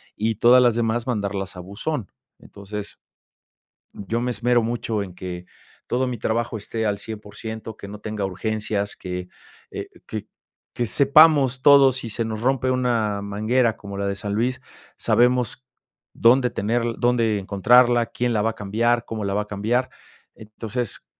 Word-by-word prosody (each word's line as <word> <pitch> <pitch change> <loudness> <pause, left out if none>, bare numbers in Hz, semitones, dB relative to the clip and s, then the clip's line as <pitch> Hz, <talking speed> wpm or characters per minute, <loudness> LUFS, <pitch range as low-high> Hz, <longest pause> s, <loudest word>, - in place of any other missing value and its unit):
y 110 +1 -1
todas 125 +4 +6
las 120 -2 +4
demás 115 0 0
mandarlas 100 -5 -3
a - - -8
buzón. 100 - -4 0.3
Entonces, 105 0 -8 1.0
yo 115 +4 -3
me 125 - -1
esmero 120 0 +2
mucho 115 -2 -2
en 95 -3 -8
que 90 -1 -7 0.4
todo 130 +1 0
mi 125 - -3
trabajo 115 +1 -1
esté 110 +1 -3
al 105 - 0
100% 110 +1 -7
que 100 - -10
no 105 +1 -9
tenga 105 -2 -4
urgencias, 105 +1 -2
que, 90 -1 -6 0.4
eh, - - -6 0.2
que - - -6 0.5
que 120 - 0
sepamos 140 -1 +5
todos 140 -3 +7
sí 115 - -6
se 115 +2 -2
nos 110 -1 -4
rompe 130 +1 +1
una 115 -5 0
manguera 110 +4 +1
como 100 -1 -8
la 100 0 -1
de 100 - -2
San 100 0 -4
Luis, 125 +4 0 0.4
sabemos 125 0 +1 0.5
dónde 125 +2 +4
tener 115 +1 -1 0.2
dónde 115 -3 +2
encontrarla, 120 +5 +4
quién 120 +1 -2
la 110 - +1
va 115 - +1
a - - -8
cambiar, 115 +3 0
cómo 110 -2 -5
la 100 - -1
va 105 - +1
a - - -10
cambiar. 110 +5 -1 0.4
Entonces, 110 +1 -6
110 Hz, 160 wpm, -23 LUFS, 105-120 Hz, 1.0 s, todos